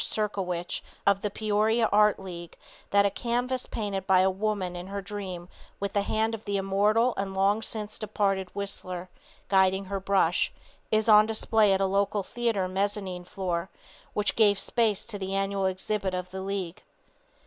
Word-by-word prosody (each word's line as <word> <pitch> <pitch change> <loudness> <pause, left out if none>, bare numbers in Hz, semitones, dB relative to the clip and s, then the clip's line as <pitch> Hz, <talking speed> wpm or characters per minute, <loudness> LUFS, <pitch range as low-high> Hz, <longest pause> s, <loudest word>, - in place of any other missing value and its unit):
Serkowich 185 -5 -2 0.2
of 200 -1 +3
the 210 - -1
Peoria 215 +2 +1
Art 210 0 +5
League 175 -3 -8 0.3
that 200 0 +4
a 200 - +2
canvas 245 +3 -1
painted 200 -3 -3
by 185 -1 +5
a 190 0 +3
woman 195 -2 -2
in 175 +1 -6
her 200 +1 -4
dream 185 -3 -6 0.3
with 200 0 -3
the 205 - +2
hand 220 +2 0
of 220 -1 -6
the 200 -1 -1
immortal 205 +5 +2
and 195 -1 -3
long 200 +3 +2
since 215 -1 -4
departed 195 -3 0
Whistler 185 -2 -3 0.4
guiding 190 0 +3
her 195 +1 -3
brush, 190 -3 +2 0.4
is 215 0 +2
on 215 -1 +7
display 220 -1 +2
at 190 0 +2
a - - +3
local 200 +1 +1
theater 225 -4 -1
mezzanine 190 -1 -2
floor 180 -1 -3 0.5
which 210 0 0
gave 205 -3 +5
space 215 0 +1
to 210 -3 -4
the 190 0 -3
annual 195 0 0
exhibit 190 0 -2
of 180 0 -5
the 190 0 -5
League. 190 -3 -4
200 Hz, 170 wpm, -27 LUFS, 190-210 Hz, 0.5 s, on